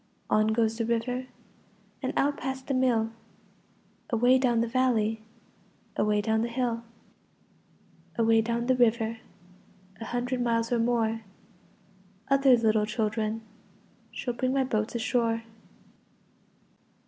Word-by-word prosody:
On 215 0 +4
goes 225 0 +1
the - - +1
river 250 +2 -1 0.7
And - - -1
out 285 +1 +2
past 265 0 -4
the 275 - -2
mill, 240 -4 +2 1.0
Away 245 +3 +4
down 240 -3 +2
the 235 - 0
valley, 225 -3 +1 0.7
Away 210 0 +2
down 220 +1 +1
the 235 - 0
hill. 235 -1 -1 1.4
Away 225 -1 +4
down 235 +1 -1
the 255 +1 +3
river, 230 -2 +2 0.8
A 225 - -6
hundred 245 +2 -2
miles 230 -1 0
or 240 - +2
more, 225 -1 +1 1.1
Other 270 -2 +6
little 220 -2 +2
children 220 0 -2 0.7
Shall 250 -3 -4
bring 255 +2 -1
my 270 -1 +2
boats 220 -3 -2
ashore. 230 -1 0
230 Hz, 120 wpm, -28 LUFS, 225-250 Hz, 1.4 s, Other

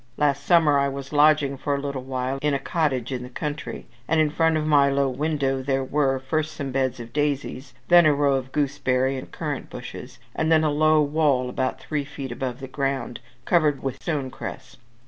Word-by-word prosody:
Last 145 -1 +1
summer 160 -5 +5
I 140 - +2
was 135 +1 -7
lodging 145 -2 +4
for 140 +2 -1
a - - -2
little 140 -2 -4
while 130 +1 -3
in 150 -1 +1
a - - -1
cottage 135 -5 -1
in 125 -2 -3
the 125 - -8
country, 150 +3 -5 0.2
and 160 - +2
in 155 -1 +3
front 160 0 +2
of 155 - -1
my 145 -2 +4
low 140 0 +2
window 135 0 -1
there 135 0 0
were, 135 0 +1
first 155 +4 -2
some 140 -3 -4
beds 130 -1 -1
of 120 0 -9
daisies, 145 -3 -2
then 175 -2 +7
a 150 - +5
row 140 -1 +2
of 130 -1 -2
gooseberry 135 -2 0
and 130 - -7
currant 150 -4 -4
bushes, 125 +1 -9 0.2
and 160 +1 0
then 160 -1 +5
a 155 - +2
low 155 +1 +4
wall 145 -4 +1
about 130 +1 -2
three 150 -2 -3
feet 135 -2 -7
above 125 +1 -4
the 135 - -6
ground, 135 -2 -2 0.3
covered 155 -5 +2
with 135 -2 -4
stone 145 -6 -2
cress. 130 +1 -8
140 Hz, 205 wpm, -24 LUFS, 130-150 Hz, 0.3 s, then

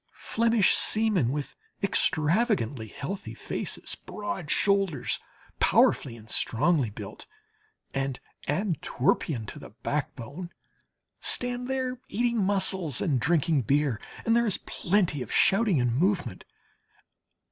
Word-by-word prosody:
Flemish 230 -3 +2
seamen 215 - +3
with 145 +1 -3 0.3
extravagantly 165 - +2
healthy 155 - -6
faces, - - -4
broad 195 -6 -6
shoulders, 195 -4 +1 0.4
powerfully 115 - +3
and 110 -1 -15
strongly 135 +4 +2
built, 105 -1 -9 0.7
and 135 -1 -2 0.3
Antwerpian 145 - 0
to - - -9
the - - -11
backbone, 145 - -5 0.7
stand 245 0 +1
there 255 -1 -2
eating 235 0 0
mussels 190 -7 +2
and 140 -7 +1
drinking 155 +2 +2
beer, 135 -1 +1 0.2
and 230 - +3
there 235 0 +3
is 205 - +3
plenty 180 -6 0
of 120 - -6
shouting 195 - +3
and 120 -1 +1
movement. 170 - 0
165 Hz, 110 wpm, -27 LUFS, 135-205 Hz, 0.7 s, seamen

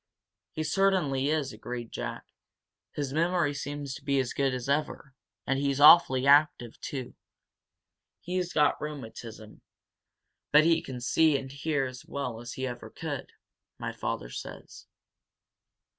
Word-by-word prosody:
"He 155 - -2
certainly 155 -6 +1
is," 150 -4 -1
agreed 120 -2 -7
Jack. - - -5 0.7
"His 140 -2 -4
memory 170 -1 +1
seems 145 -1 -5
to - - -10
be 140 -1 +1
as 130 -2 -1
good 135 -1 +1
as 125 -1 -4
ever, 140 -1 -2 0.3
and 135 0 0
he's 140 -1 0
awfully 145 -4 +7
active, 140 -5 +4
too. 130 -4 -5 1.1
He's 180 0 -3
got 150 -3 +2
rheumatism, 115 -7 -8 0.9
but 150 +1 +7
he 165 0 +3
can 125 -2 -7
see 155 +3 +3
and 135 -1 -7
hear 140 0 -1
as 130 0 -8
well 125 -5 -5
as 120 0 -7
he 130 - -3
ever 120 -1 -6
could, - - -6 0.4
my - - -4
father - - -4
says." - - -9
140 Hz, 140 wpm, -28 LUFS, 130-150 Hz, 1.1 s, awfully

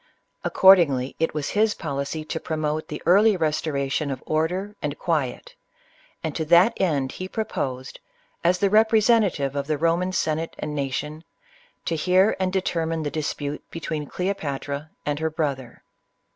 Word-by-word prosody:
Accordingly, 160 -9 +5
it 165 -1 0
was 150 -2 -2
his 215 +1 +2
policy 145 +1 -4
to 160 - -3
promote 155 0 -2
the 150 - -7
early 200 +3 +5
restoration 150 -2 -1
of 130 -2 -5
order 180 +6 -1
and 145 -1 -3
quiet, 160 - -2 0.7
and - - -3
to 160 - -1
that 175 +7 +6
end 145 -8 +1
he 185 - -6
proposed, 135 - -4 0.4
as 175 +2 +3
the 195 +1 +1
representative 215 - +3
of 140 0 -2
the 155 -1 0
Roman 170 +4 +1
Sen 155 -3 0
ate 165 - -6
and 150 - -4
nation, 150 +2 -3 0.6
to 165 - 0
hear 185 +5 +3
and 185 -1 0
determine 165 -4 -1
the 145 - -3
dispute 150 -1 -3
be 165 - -7
tween 155 -3 -4
Cleopatra 150 -5 -3 0.2
and 145 0 -1
her 160 0 0
brother. 140 -6 -4
160 Hz, 155 wpm, -24 LUFS, 145-185 Hz, 0.7 s, that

